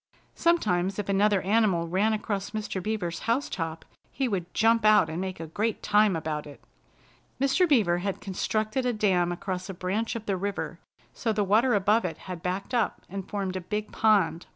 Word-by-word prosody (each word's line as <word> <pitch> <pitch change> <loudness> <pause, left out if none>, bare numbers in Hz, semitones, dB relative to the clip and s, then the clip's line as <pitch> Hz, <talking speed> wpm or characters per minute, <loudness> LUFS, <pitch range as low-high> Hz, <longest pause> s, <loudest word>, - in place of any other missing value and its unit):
Sometimes 195 - +1
if 205 -1 -4
another 200 0 +3
animal 195 -4 +2
ran 195 +6 +2
across 210 -2 -2
Mr. 210 -3 -3
Beaver's 180 -5 -3
house 255 +5 +1
top 165 -2 -4 0.3
he 270 -1 -1
would 185 -6 -3
jump 225 +1 +3
out 215 -7 +5
and 165 +3 -3
make 190 -2 -4
a 165 - -5
great 210 +7 -2
time 210 -2 +4
about 155 -2 -3
it. 145 - -12 0.8
Mr. 275 +7 +3
Beaver 200 - +3
had 195 +1 -3
constructed 215 +5 -1
a 250 -1 0
dam 185 -5 +2
across 185 +1 -4
a 195 - -5
branch 200 +7 -2
of 225 -1 -5
the 195 -3 -1
river 200 +2 -4 0.3
so 230 - -1
the 210 -1 +1
water 220 +5 +3
above 205 +3 +3
it 165 -3 -3
had 180 -3 -6
backed 185 +7 -3
up 235 -3 0
and 195 0 -6
formed 195 -2 -3
a 185 - -3
big 210 +3 -4
pond. 200 -6 +2
200 Hz, 190 wpm, -27 LUFS, 180-220 Hz, 0.8 s, out